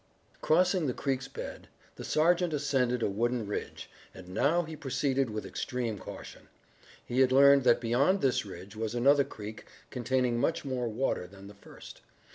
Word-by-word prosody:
Crossing 180 0 +2
the 125 - -2
creek's 135 -1 -2
bed - - -8 0.3
the - - -8
sergeant 170 +2 +2
ascended 130 -4 0
a - - +2
wooded 115 +2 -1
ridge, 105 - -5 0.3
and 90 -1 -11
now 155 - +2
he 160 -1 -8
proceeded 135 -2 -1
with 110 0 -5
extreme 120 -6 -3
caution. - - -10 0.6
He 125 - -2
had 130 -1 +4
learned 140 +1 +6
that 120 -1 +5
beyond 135 +12 +2
this 135 -2 +1
ridge 95 0 -10
was 110 +1 -3
another 140 +4 +4
creek 110 -3 -9 0.3
containing 125 -1 0
much 160 +3 0
more 130 -3 -2
water 115 -5 -2
than 95 +1 -14
the 100 - -11
first. 100 - -14
125 Hz, 165 wpm, -30 LUFS, 115-140 Hz, 0.6 s, learned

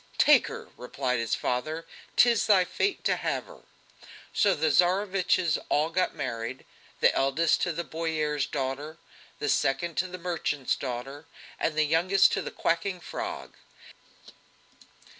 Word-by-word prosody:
"Take - - +6
her!" - - -8
replied 125 0 -2
his 115 -1 0
father, 155 +7 -2 0.3
"'tis 235 -3 +4
thy 195 -4 +5
fate 400 - -1
to - - +2
have - - -2
her!" - - -14 0.7
So 200 -3 +3
the 155 0 +1
Tsareviches 185 -1 +2
all 155 +3 +1
got 185 +2 0
married 125 -2 -5 0.4
the - - +5
eldest 135 +5 +2
to 175 - +1
the 170 +1 -3
boyar's 155 -3 -2
daughter, 140 +3 -4 0.4
the 145 - -3
second 160 +5 0
to 185 - +1
the 185 0 -7
merchant's 170 -6 -1
daughter, 135 +3 -6 0.3
and 155 - 0
the 155 - +4
youngest 175 +6 +4
to - - 0
the - - -5
quacking 175 +3 -1
frog. - - -6
160 Hz, 140 wpm, -27 LUFS, 135-180 Hz, 0.7 s, Take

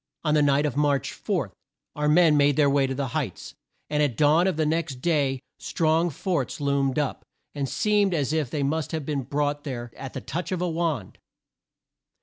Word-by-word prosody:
On 150 -2 +1
the 150 - +4
night 145 0 +3
of 145 - -2
March 145 -1 +1
4, 160 - -2 0.4
our 150 0 0
men 160 -1 +5
made 145 -1 +4
their 145 -1 +4
way 140 -1 +3
to 135 - -3
the 135 -1 -2
Heights, 135 - -4 0.3
and 150 0 0
at 135 -7 0
dawn 155 +5 +4
of 185 -5 0
the 155 - +1
next 160 -2 -1
day 140 -2 0 0.2
strong 165 +1 +1
forts 160 -2 -2
loomed 140 -1 0
up, 145 -3 -1 0.3
and 140 -2 -3
seemed 205 -3 +2
as 145 -1 0
if 155 -5 0
they 145 +1 -2
must 155 +3 -1
have 160 -3 -3
been 145 -2 -1
brought 145 +2 -2
there 120 -4 -5
at 135 - -8
the - - -5
touch 175 +2 -4
of 185 - -1
a 180 - 0
wand. 160 - -2
150 Hz, 200 wpm, -25 LUFS, 140-160 Hz, 0.4 s, men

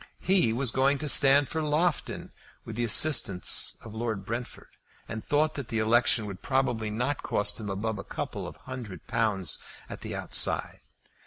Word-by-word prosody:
He 185 -11 +3
was 120 +1 +1
going 135 +3 +2
to 150 - -4
stand 140 0 +5
for 160 - -3
Loughton, 155 +2 -1 0.3
with 110 - -7
the 120 - -1
assistance 115 -5 +4
of 110 - -9
Lord 110 -3 -4
Brentford, 120 +3 -6 0.4
and 110 -1 -6
thought 155 +1 +1
that 140 -4 -6
the 115 - -3
election 115 0 +2
would 100 -3 -8
probably 125 -5 -1
not 125 +6 -2
cost 105 - 0
him 105 -2 -6
above 105 +2 -3
a - - -6
couple - - -5
of - - -9
hundred 115 -9 -9
pounds 100 -7 0 0.3
at - - -9
the - - -6
outside. - - 0
120 Hz, 170 wpm, -27 LUFS, 110-140 Hz, 0.4 s, stand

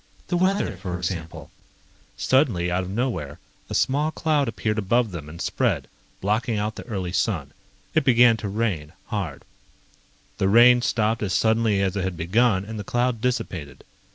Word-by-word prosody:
The 175 - +1
weather, 185 - +1
for 90 -2 -4
example 85 -2 -5 0.3
..." - - -33 0.3
Suddenly, 115 - +2
out 90 +1 +1
of - - -7
nowhere, 95 - -2 0.3
a - - -3
small 145 +4 +2
cloud 155 -3 0
appeared 110 -1 -1
above 115 +2 +1
them 80 -4 -7
and 85 +2 -10
spread, - - 0 0.3
blocking 110 +3 0
out 105 +1 -1
the - - -9
early 95 -6 -3
sun. 85 - -1 0.4
It 155 - +3
began 120 -2 +6
to 105 - -4
rain, 95 -8 -2 0.2
hard. 85 -10 -4 1.0
The 95 - +2
rain 120 +3 +7
stopped 110 -1 0
as 100 -3 -1
suddenly 110 -3 +2
as 95 0 -1
it 95 - -1
had 95 -2 -3
begun 95 +3 +2
and 110 0 -6
the - - -4
cloud 120 +1 0
dissipated. 90 - -3
105 Hz, 170 wpm, -24 LUFS, 90-120 Hz, 1.0 s, rain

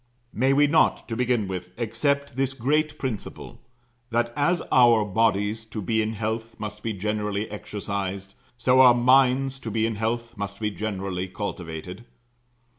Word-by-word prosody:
May 130 +5 +2
we 145 +2 +5
not, 160 +2 +2
to 115 - -2
begin 120 -3 +1
with, 90 -1 -6
accept 140 +4 -1
this 135 0 -1
great 150 +4 0
principle 125 -8 -6 0.5
that, 120 0 0
as 170 +4 +1
our 120 -4 +6
bodies, 105 +1 +1
to 110 0 -7
be 110 +3 0
in 110 +1 -2
health, 110 +1 -4
must 105 0 -6
be 115 - -2
generally 105 +1 -2
exercised, 100 -2 -4 0.2
so 125 +2 +3
our 125 -2 +8
minds, 130 +2 +3
to 120 - -6
be 110 +1 0
in 115 -2 -2
health, 115 +2 -2
must 100 -1 -5
be 105 -1 -1
generally 95 -2 -3
cultivated? 90 0 -6
110 Hz, 155 wpm, -25 LUFS, 100-125 Hz, 0.5 s, our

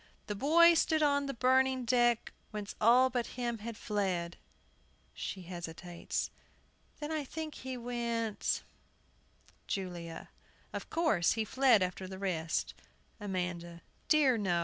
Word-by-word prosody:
"The 210 - -3
boy 330 +10 +6
stood 315 -1 +2
on 285 -1 +2
the 275 - -2
burning 260 +1 +3
deck, 240 -1 +2 0.2
Whence 210 -1 -5
all 250 +4 +6
but 245 -2 -1
him 240 -2 -2
had 225 +1 -6
fled 185 -5 -1 0.4
" - - -36 0.3
[She 190 - -5
hesitates. 175 0 -5 0.3
] - - -35
Then 295 +1 -4
I 310 -2 -1
think 310 +2 -6
he 260 -1 -6
went 235 -2 -1 1.0
JULIA. 175 -4 -5 0.4
Of - - -5
course, 315 - +2
he 225 -1 -1
fled 250 -4 +4
after 185 +1 -3
the 190 0 -7
rest. 170 -4 -1 0.5
AMANDA. 175 -4 -4 0.2
Dear, 275 -6 +4
no! 180 -4 +1
230 Hz, 135 wpm, -32 LUFS, 185-260 Hz, 1.0 s, boy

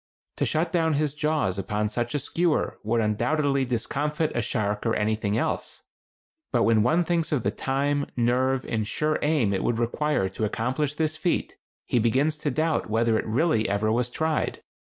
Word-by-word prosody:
To - - +1
shut 160 +4 0
down 160 -3 +2
his 145 -1 0
jaws 150 - 0
upon 105 +2 -1
such 120 +5 -2
a - - +3
skewer 165 +3 0
would 115 +2 +1
undoubtedly 135 +6 +1
discomfit 145 +6 -1
a 120 - +1
shark 105 -1 -1
or 115 - +1
anything 105 0 0
else; - - -2 0.7
but - - +2
when 115 -1 +4
one 160 +10 +3
thinks 170 -1 0
of 140 -7 0
the 100 - +1
time, 140 +4 -1
nerve, 130 +2 +1
and 110 -2 -2
sure 155 +6 0
aim 145 -9 +2
it 95 - -1
would 115 - 0
require 120 -1 0
to 95 +3 -5
accomplish 130 +7 -1
this 155 0 -1
feat, 175 +2 -1 0.3
he 120 - +1
begins 135 +7 +1
to 150 - -1
doubt 155 -1 0
whether 115 +1 +2
it - - -4
really 115 -2 +1
ever 105 +2 +1
was 120 +2 +1
tried. 160 +4 -1
130 Hz, 180 wpm, -26 LUFS, 110-150 Hz, 0.7 s, when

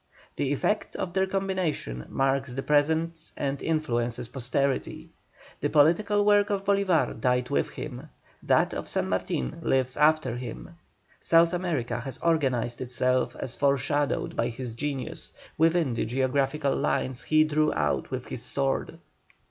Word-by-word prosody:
The 140 - -1
effect 210 +9 -1
of 175 -2 -3
their 190 0 +2
combination 185 - -2
marks 135 -1 0
the 135 - -3
present 160 +2 +1
and 140 -1 -2
influences 120 -7 -1
posterity. 135 +1 -2 0.5
The - - 0
political 200 +8 +3
work 205 -1 +4
of 200 -1 -1
Bolívar 200 -4 +2
died 125 0 +1
with - - +1
him; 145 +1 -7 0.3
that - - +2
of - - -5
San - - -1
Martin 65 -2 -2
lives 130 -1 +1
after 150 -5 +3
him; 125 +7 -7 0.5
South 165 +1 +4
America 145 -10 -1
has 130 0 -5
organized 130 -8 0
itself 125 0 0
as 125 - -4
foreshadowed 140 +1 0
by 115 - +1
his 120 0 -6
genius, 135 +1 -4 0.2
within 165 -4 +2
the 115 - -1
geographical 135 +4 0
lines 130 -1 -1
he 155 0 +4
drew 155 0 +2
out 75 -2 -1
with - - -4
his - - -5
sword. 70 - -1
140 Hz, 140 wpm, -27 LUFS, 125-165 Hz, 0.5 s, work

